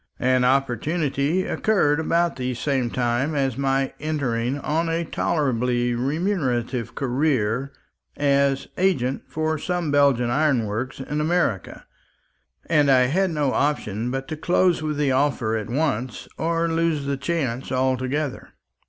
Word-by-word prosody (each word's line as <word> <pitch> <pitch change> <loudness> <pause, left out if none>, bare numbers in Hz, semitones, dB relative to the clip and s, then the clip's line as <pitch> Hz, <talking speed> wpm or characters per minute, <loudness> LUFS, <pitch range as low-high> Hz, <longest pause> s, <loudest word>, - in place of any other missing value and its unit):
An 130 0 +2
opportunity 140 - +1
occurred 160 -9 +2
about 170 +1 +1
the 125 -1 -3
same 130 -1 0
time 125 +5 0
of 135 -3 0
my 135 0 0
entering 135 -4 -1
on 160 +3 -1
a 165 +1 -1
tolerably 125 -7 0
remunerative 130 - -1
career 130 -2 0 0.5
as 140 -1 +2
agent 140 -9 +1
for 155 0 -1
some 175 -2 -2
Belgian 140 -4 +3
ironworks 130 -4 0
in 150 +3 -2
America; 155 - -1 0.8
and 150 -4 +3
I 130 -1 +6
had 180 +10 +2
no 150 -5 0
option 120 -6 -1
but 135 +1 -3
to 155 - -3
close 175 +2 +2
with 155 -1 -2
the 145 -2 +1
offer 130 -4 +1
at 110 -1 -4
once 130 -3 -2
or 165 +1 0
lose 165 -3 0
the 140 0 -1
chance 135 -3 -2
altogether. 130 +2 -1
140 Hz, 130 wpm, -23 LUFS, 125-155 Hz, 0.8 s, I